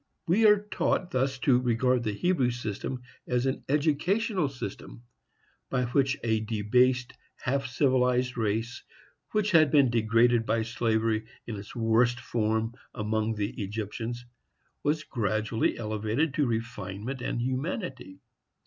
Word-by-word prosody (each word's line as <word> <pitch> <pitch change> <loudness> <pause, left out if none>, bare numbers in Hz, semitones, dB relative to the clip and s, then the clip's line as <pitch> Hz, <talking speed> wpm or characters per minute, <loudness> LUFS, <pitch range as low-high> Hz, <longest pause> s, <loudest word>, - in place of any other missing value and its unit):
We 210 +6 +5
are 210 0 +7
taught 180 -1 0
thus 135 -1 0
to 125 -3 +5
regard 125 0 +2
the 110 -3 -1
Hebrew 135 - +1
system 120 +2 -4 0.2
as 125 +1 +1
an 130 - -1
educational 165 +5 +1
system, - - -8 0.7
by 125 -1 0
which 135 +3 +1
a 110 -2 +2
debased, 120 +4 +1 0.2
half 135 +2 -1
civilized 125 -1 +2
race, 115 +1 -1 0.5
which 210 -1 +1
had 155 -4 +6
been 135 -3 +4
degraded 115 +1 +3
by 115 0 0
slavery 110 -1 0 0.2
in 115 - -5
its 100 0 -9
worst 115 +1 +2
form 110 -1 -1 0.2
among 110 +1 -1
the 105 +1 -2
Egyptians, 110 +4 -4 0.6
was 155 +1 0
gradually 110 -2 -1
elevated 110 +7 -1
to 145 -1 +1
refinement 115 +1 -4
and 120 - -2
humanity. 130 - -3
120 Hz, 130 wpm, -28 LUFS, 110-135 Hz, 0.7 s, are